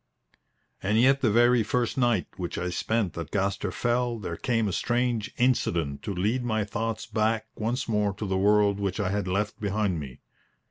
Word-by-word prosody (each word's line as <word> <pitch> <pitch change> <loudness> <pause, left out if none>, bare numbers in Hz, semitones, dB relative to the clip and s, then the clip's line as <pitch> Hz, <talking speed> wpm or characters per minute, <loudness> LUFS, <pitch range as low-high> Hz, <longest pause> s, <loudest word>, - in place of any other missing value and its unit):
And 105 +3 +2
yet 135 +3 +4
the 120 - +3
very 120 +2 +4
first 120 +2 0
night 120 -7 +2
which 90 -2 -4
I 90 0 -2
spent 110 +1 -1
at 80 -2 -5
Gaster 100 0 -1
Fell 120 +4 0
there 90 -6 -5
came 115 +3 0
a - - -1
strange 120 -1 0
incident 85 - +1
to - - -4
lead 110 +8 0
my 110 -3 0
thoughts 115 +2 -3
back 110 0 0
once 120 +4 -2
more 105 -2 +1
to 105 - -4
the 95 -1 -1
world 100 +1 +3
which 100 -1 -2
I 100 -2 0
had 100 -1 -1
left 100 +3 -1
behind 100 -4 0
me. 65 -4 -9
105 Hz, 185 wpm, -27 LUFS, 95-120 Hz, -, yet